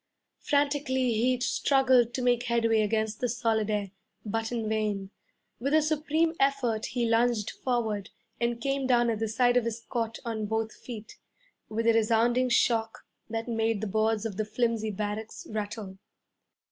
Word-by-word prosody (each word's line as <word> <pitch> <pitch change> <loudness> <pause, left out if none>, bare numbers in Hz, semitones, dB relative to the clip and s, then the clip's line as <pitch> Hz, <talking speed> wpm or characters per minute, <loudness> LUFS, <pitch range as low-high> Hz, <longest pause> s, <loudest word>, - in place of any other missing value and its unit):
Frantically 280 -4 +1
he 245 +3 +2
struggled 260 -3 +3
to 255 - -2
make 245 -1 +3
headway 230 -2 +2
against 220 0 0
the 245 - 0
solid 225 -2 0
air, 205 -2 -1 0.3
but 225 +2 -2
in 230 -2 -2
vain. 210 -3 -1 0.5
With 275 +6 +1
a 315 - +6
supreme 310 +1 +1
effort 265 -5 +1
he 240 -1 -1
lunged 230 -2 +2
forward 220 -5 -2 0.3
and 235 0 0
came 275 +1 -1
down 240 -2 +3
at 220 - -3
the 225 - 0
side 245 +3 +3
of 245 - +2
his 230 0 -2
cot 230 -2 -1
on 220 -2 -2
both 220 +1 -1
feet, 225 -3 -9 0.5
with 225 +1 -2
a 230 - +5
resounding 235 +3 +3
shock 225 -2 +1 0.2
that 225 +1 -3
made 225 -2 0
the 215 - -3
boards 220 +1 0
of 205 -4 -4
the 215 - +1
flimsy 225 0 0
barracks 210 +2 -4
rattle. 210 -2 -5
230 Hz, 160 wpm, -28 LUFS, 220-245 Hz, 0.5 s, a